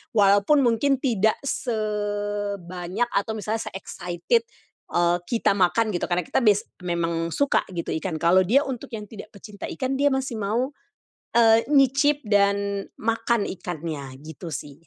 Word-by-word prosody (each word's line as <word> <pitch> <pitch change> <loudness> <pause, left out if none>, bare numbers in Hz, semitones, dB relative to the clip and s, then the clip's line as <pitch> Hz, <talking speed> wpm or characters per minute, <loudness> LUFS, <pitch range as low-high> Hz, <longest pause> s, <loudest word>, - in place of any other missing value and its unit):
Walaupun 205 +7 +5
mungkin 255 +3 +2
tidak 220 -4 +2
sebanyak, 205 -4 -2
atau 200 +2 0
misalnya 215 +1 -2
se-excited, 180 - -1 0.5
eee, 175 0 +3
kita 230 +2 +2
makan, 210 +4 +2
gitu. 175 - -1
Karena 175 0 0
kita - - +1
bias 210 -3 +4 0.2
memang 170 -1 -1
suka, 285 -1 +2
gitu, 170 - -3
ikan. 175 -1 -3
Kalau 180 +3 +4
dia 270 +8 +4
untuk 255 -3 -5
yang 210 - -6
tidak 210 0 -11
pecinta 205 0 -9
ikan, 265 0 -2
dia 285 - +4
masih 265 -4 -2
mau, 230 +7 -1 0.6
eee, 230 -1 +5
nyicip, 280 +1 +3
dan 200 -1 +1
makan 230 0 0
ikannya, 160 -7 -6
gitu 160 +2 -8
sih. 150 +3 -8
205 Hz, 140 wpm, -24 LUFS, 180-235 Hz, 0.6 s, Walaupun